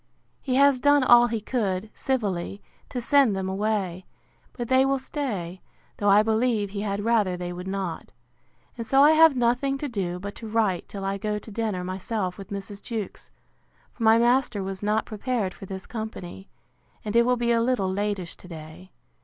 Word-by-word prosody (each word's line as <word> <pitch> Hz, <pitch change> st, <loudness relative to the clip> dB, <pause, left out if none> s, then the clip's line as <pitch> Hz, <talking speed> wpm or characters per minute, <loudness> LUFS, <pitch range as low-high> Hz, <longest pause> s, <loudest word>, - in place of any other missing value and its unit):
He 255 Hz, -3 st, -1 dB
has 280 Hz, -1 st, +5 dB
done 285 Hz, +1 st, +4 dB
all 240 Hz, -1 st, +7 dB
he 225 Hz, -1 st, -2 dB
could, 210 Hz, -3 st, -2 dB
civilly, 200 Hz, -7 st, -2 dB, 0.3 s
to 250 Hz, -, -3 dB
send 260 Hz, -3 st, +3 dB
them 190 Hz, 0 st, -2 dB
away; 190 Hz, -2 st, -2 dB, 0.5 s
but 240 Hz, -2 st, -5 dB
they 260 Hz, +1 st, +4 dB
will 270 Hz, 0 st, +2 dB
stay, 210 Hz, -, -4 dB, 0.4 s
though 205 Hz, -, +1 dB
I 205 Hz, +2 st, +6 dB
believe 220 Hz, -2 st, +1 dB
he 200 Hz, 0 st, -4 dB
had 205 Hz, 0 st, -2 dB
rather 210 Hz, -6 st, +2 dB
they 175 Hz, 0 st, -5 dB
would 180 Hz, +1 st, -7 dB
not. 190 Hz, -3 st, -4 dB, 0.7 s
And 230 Hz, -, -4 dB
so 270 Hz, +4 st, +5 dB
I 300 Hz, -, +7 dB
have 320 Hz, -2 st, +6 dB
nothing 245 Hz, +3 st, +1 dB
to 290 Hz, -, -4 dB
do 190 Hz, -8 st, -3 dB
but 200 Hz, +2 st, -6 dB
to 225 Hz, -, -8 dB
write 215 Hz, -5 st, 0 dB
till 195 Hz, -1 st, -6 dB
I 195 Hz, 0 st, -2 dB
go 210 Hz, 0 st, -2 dB
to 210 Hz, +1 st, -10 dB
dinner 210 Hz, -4 st, -2 dB
myself 185 Hz, +1 st, -3 dB
with 195 Hz, -, -9 dB
Mrs. 200 Hz, 0 st, -6 dB
Jewkes: 225 Hz, -4 st, -6 dB, 0.6 s
for -, -, -15 dB
my 225 Hz, 0 st, +6 dB
master 240 Hz, -3 st, +2 dB
was 190 Hz, 0 st, -5 dB
not 210 Hz, +1 st, +1 dB
prepared 215 Hz, -3 st, -2 dB
for 195 Hz, -, -11 dB
this 190 Hz, 0 st, -7 dB
company; 215 Hz, -4 st, -7 dB, 0.6 s
and 210 Hz, +1 st, -3 dB
it 235 Hz, -, +6 dB
will 250 Hz, +1 st, +2 dB
be 235 Hz, 0 st, +1 dB
a 230 Hz, -1 st, +3 dB
little 230 Hz, -6 st, 0 dB
latish 200 Hz, -3 st, -2 dB
to -, -, -14 dB
day. 155 Hz, -, -11 dB
210 Hz, 190 wpm, -25 LUFS, 190-240 Hz, 0.7 s, all